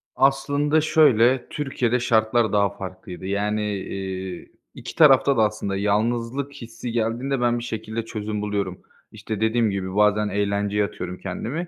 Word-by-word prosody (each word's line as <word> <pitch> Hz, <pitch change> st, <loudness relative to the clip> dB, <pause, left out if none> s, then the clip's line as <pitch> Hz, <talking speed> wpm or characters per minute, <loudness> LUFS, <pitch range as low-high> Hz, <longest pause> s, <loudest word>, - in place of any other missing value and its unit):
Aslında 140 Hz, +3 st, +2 dB
şöyle, 130 Hz, -5 st, +4 dB
Türkiye'de 125 Hz, -4 st, -1 dB
şartlar 110 Hz, -1 st, +2 dB
daha 100 Hz, -1 st, +3 dB
farklıydı. 95 Hz, -1 st, -8 dB
Yani, 105 Hz, +2 st, -1 dB
iii, 95 Hz, -1 st, -6 dB, 0.2 s
2 -, -, -8 dB
tarafta 140 Hz, -3 st, +5 dB
da 110 Hz, -, +5 dB
aslında 105 Hz, -2 st, -1 dB
yalnızlık 115 Hz, +7 st, -1 dB
hissi 120 Hz, -2 st, -7 dB
geldiğinde 120 Hz, +4 st, -1 dB
ben 120 Hz, 0 st, +2 dB
bir -, -, -7 dB
şekilde 110 Hz, -1 st, -4 dB
çözüm 105 Hz, -2 st, -4 dB
buluyorum. 100 Hz, -3 st, -3 dB, 0.3 s
İşte, 110 Hz, -2 st, -6 dB
dediğim 110 Hz, 0 st, +2 dB
gibi 95 Hz, -1 st, -4 dB
bazen 105 Hz, 0 st, +3 dB
eğlenceye 100 Hz, 0 st, 0 dB
atıyorum 90 Hz, -2 st, -6 dB
kendimi 125 Hz, -, -4 dB
110 Hz, 140 wpm, -23 LUFS, 100-125 Hz, 0.3 s, tarafta